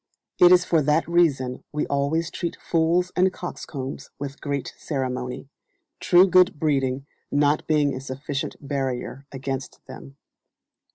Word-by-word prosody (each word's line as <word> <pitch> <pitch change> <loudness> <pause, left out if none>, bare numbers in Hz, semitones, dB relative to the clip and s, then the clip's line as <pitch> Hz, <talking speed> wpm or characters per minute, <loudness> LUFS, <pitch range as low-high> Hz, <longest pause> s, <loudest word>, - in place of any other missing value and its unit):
It 175 0 +8
is 180 -1 +6
for 165 -2 +3
that 150 +3 +2
reason 145 -7 +1
we 150 - -1
always 145 +4 0
treat 170 - -4
fools 170 +2 +1
and 185 +1 +3
coxcombs 140 -7 -6
with 140 0 -7
great 140 -2 -3
ceremony, 130 -3 -4 0.5
true 180 +2 +6
good 185 -3 +4
breeding 135 -3 0 0.3
not 145 +1 +2
being 150 -3 +2
a 130 - -5
sufficient 135 +1 -4
barrier 135 -1 -4
against 135 0 -5
them. 70 +1 -11
145 Hz, 130 wpm, -24 LUFS, 135-165 Hz, 0.5 s, It